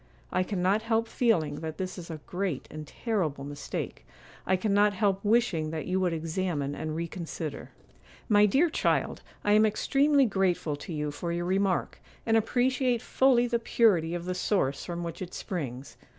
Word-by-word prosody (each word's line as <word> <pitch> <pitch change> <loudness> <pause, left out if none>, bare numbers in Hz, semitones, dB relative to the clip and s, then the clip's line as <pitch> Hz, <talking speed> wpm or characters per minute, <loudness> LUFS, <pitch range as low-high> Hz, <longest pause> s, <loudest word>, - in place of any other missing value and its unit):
I 185 - +2
cannot 190 +2 +1
help 225 0 0
feeling 170 - +1
that 160 0 -5
this 185 -1 -4
is 175 -2 -9
a 160 -2 -6
great 180 -6 -3
and 155 0 -7
terrible 165 - -2
mistake. 145 0 -5 0.4
I 185 - +4
cannot 205 +1 +3
help 195 -1 +1
wishing 205 -8 +2
that 155 -1 -4
you 185 +1 0
would 185 -2 +1
examine 160 -3 -2
and 155 +1 -4
reconsider.' 165 -3 -5 0.6
'My 210 -2 +5
dear 300 - +3
child, - - 0 0.2
I 205 - +2
am 215 +1 +6
extremely 275 +6 +3
grateful 190 -7 0
to 145 - -9
you 150 -2 -2
for 170 +4 -4
your 175 0 -2
remark, 190 0 0 0.2
and 225 - +3
appreciate 245 +2 +2
fully 250 0 +3
the 235 -1 0
purity 185 -8 +2
of 175 0 -5
the 185 - -1
source 180 -7 0
from 175 -1 -4
which 170 +2 -6
it 185 -1 -6
springs. 135 -7 -5
185 Hz, 170 wpm, -28 LUFS, 160-220 Hz, 0.6 s, am